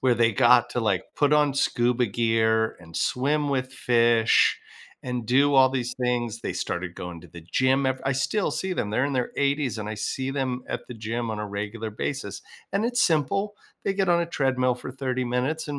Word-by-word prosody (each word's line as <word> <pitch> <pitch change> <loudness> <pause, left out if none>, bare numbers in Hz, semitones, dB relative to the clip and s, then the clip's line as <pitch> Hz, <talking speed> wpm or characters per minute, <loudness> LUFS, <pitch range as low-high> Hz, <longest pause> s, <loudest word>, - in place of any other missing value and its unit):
where 125 -2 +3
they 115 -1 +3
got 120 -2 +5
to 125 - -2
like 100 -4 0
put 145 0 +2
on 150 -2 +3
scuba 125 -2 +1
gear 110 0 +1
and 80 -1 -15
swim 145 +3 0
with 130 -1 -1
fish 115 -3 +3 0.4
and 125 -2 -4
do 140 +3 +3
all 130 -1 +6
these 125 -2 -2
things. 120 -2 -1
They - - -3
started 90 0 -4
going 90 -2 -7
to - - -15
the 85 - -11
gym 130 +10 +1
ev 130 0 -1
I 135 - +1
still 135 +10 0
see 190 0 -2
them. 105 - -2
They're 125 +5 +1
in 140 - -1
their 125 -2 -1
80s 140 -5 0
and 105 0 -5
I 110 - -3
see 130 +5 -3
them 130 -2 -2
at - - -5
the 125 - -7
gym 115 +1 -3
on 110 - -4
a 105 - -3
regular 105 +2 -4
basis 105 -2 -4 0.3
and 200 +3 +1
it's 245 +1 0
simple, 195 +6 +1 0.3
they 195 - 0
get 195 -2 0
on 170 0 +4
a - - -3
treadmill 130 -5 +1
for 125 +1 -8
30 130 -1 -2
minutes 130 +6 -2
and 145 - -3
125 Hz, 215 wpm, -25 LUFS, 115-140 Hz, 0.4 s, all